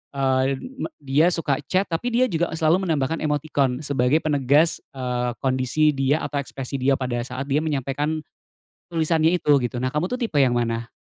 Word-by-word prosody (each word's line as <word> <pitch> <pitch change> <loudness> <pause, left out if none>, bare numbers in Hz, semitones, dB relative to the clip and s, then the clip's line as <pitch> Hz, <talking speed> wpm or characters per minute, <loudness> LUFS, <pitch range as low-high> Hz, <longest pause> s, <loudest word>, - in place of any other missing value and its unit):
eee, 135 0 +1 0.2
me - - -2 0.2
dia 140 +5 +3
suka 165 -6 0
chat 190 0 0
tapi 230 +9 -1
dia 255 -1 +3
juga 170 0 -1
selalu 165 +4 +2
menambahkan 160 0 0
emotikon 145 -3 0
sebagai 140 +1 +1
penegas, 145 +2 +2 0.2
eee, 125 -2 -2
kondisi 130 +4 +2
dia 140 +2 0
atau 145 - -2
ekspresi 135 0 -5
dia 135 +2 +3
pada 125 -2 -2
saat 130 +3 -5
dia 145 - +3
menyampaikan 150 +1 -2 0.7
tulisannya 160 -1 +2
itu 145 -3 +4
gitu. 120 0 -2
Nah 130 - -1
kamu 150 +7 -2
tuh 250 - -2
tipe 230 - -3
yang 135 -3 +4
mana? 115 -1 -1
140 Hz, 175 wpm, -23 LUFS, 130-160 Hz, 0.7 s, itu